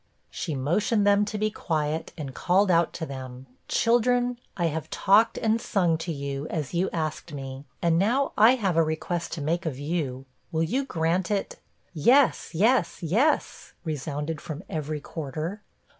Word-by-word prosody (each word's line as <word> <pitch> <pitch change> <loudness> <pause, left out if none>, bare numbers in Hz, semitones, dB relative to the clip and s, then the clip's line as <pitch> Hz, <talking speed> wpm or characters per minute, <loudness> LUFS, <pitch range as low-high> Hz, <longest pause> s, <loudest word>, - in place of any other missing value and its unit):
She 160 -5 -3
motioned 200 - +1
them 205 0 +4
to 210 0 -4
be 215 +1 0
quiet, 155 -4 -2
and 140 -4 -6
called 185 +6 +2
out 170 -1 +3
to 160 - -4
them: 130 -2 -8 0.2
'Children, 245 +1 +2 0.2
I 175 - +1
have 160 -2 -2
talked 215 +4 +4
and 225 +1 +1
sung 175 -8 +2
to 165 +1 -3
you, 140 -1 -4
as 150 -3 -4
you 175 +2 +1
asked 155 -1 -3
me; 135 0 -7 0.2
and 165 -1 +3
now 250 +8 +2
I 225 +5 +7
have 195 -8 0
a - - +6
request 160 +2 -2
to 165 - -4
make 165 +4 -1
of 140 -5 -3
you; 140 -3 -3 0.3
will 160 0 +1
you 260 +12 0
grant 170 -3 0
it?' 205 -2 -2 0.3
'Yes, 245 - +4
yes, 220 +2 +2
yes,' 225 - +1
resounded 150 0 -3
from 155 +2 -6
every 155 -1 -3
quarter. 160 +7 -5
165 Hz, 165 wpm, -26 LUFS, 150-205 Hz, 0.3 s, I